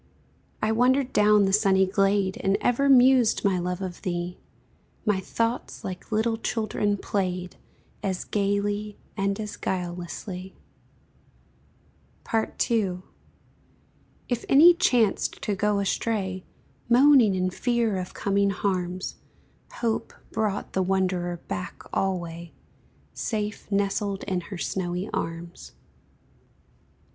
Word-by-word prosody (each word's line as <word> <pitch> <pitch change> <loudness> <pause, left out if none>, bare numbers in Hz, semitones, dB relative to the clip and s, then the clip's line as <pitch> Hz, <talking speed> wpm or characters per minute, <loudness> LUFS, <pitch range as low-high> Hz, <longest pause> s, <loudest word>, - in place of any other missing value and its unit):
I 215 - +2
wandered 255 +3 +2
down 210 -1 +5
the 195 - 0
sunny 195 -2 +4
glade 195 0 +1
And 195 0 +1
ever 275 +3 +2
mused, 255 -4 +5
my 190 -2 +2
love, 180 +2 -3
of 180 -2 -6
thee; 175 0 -3 0.7
My 210 -3 +2
thoughts, 230 +5 -2
like 185 +3 -7
little 225 +1 +1
children, 215 -2 -1
played, 185 -3 -2 0.5
As 190 -2 -2
gayly 205 +1 -1 0.2
and 195 +1 -1
as 210 -1 -5
guilelessly. 180 +1 -5 1.8
II. 220 -4 0 1.2
If 245 -2 -2
any 320 +6 +8
chanced 240 - +1
to 210 - 0
go 210 +1 +1
astray, 195 -2 -1 0.4
Moaning 250 -4 +6
in 185 0 0
fear 235 -1 0
of 180 -1 -6
coming 200 0 +1
harms, 185 -2 -2 0.6
Hope 230 -2 -1 0.2
brought 210 -2 -2
the 190 - +1
wanderer 185 -2 0
back 185 +2 -5
alway, 170 -3 -2 0.6
Safe 210 -1 -4
nestled 200 0 0
in 185 -3 -1
her 190 +2 -8
snowy 180 +2 -3
arms. 165 +1 -5
200 Hz, 110 wpm, -26 LUFS, 185-220 Hz, 1.8 s, any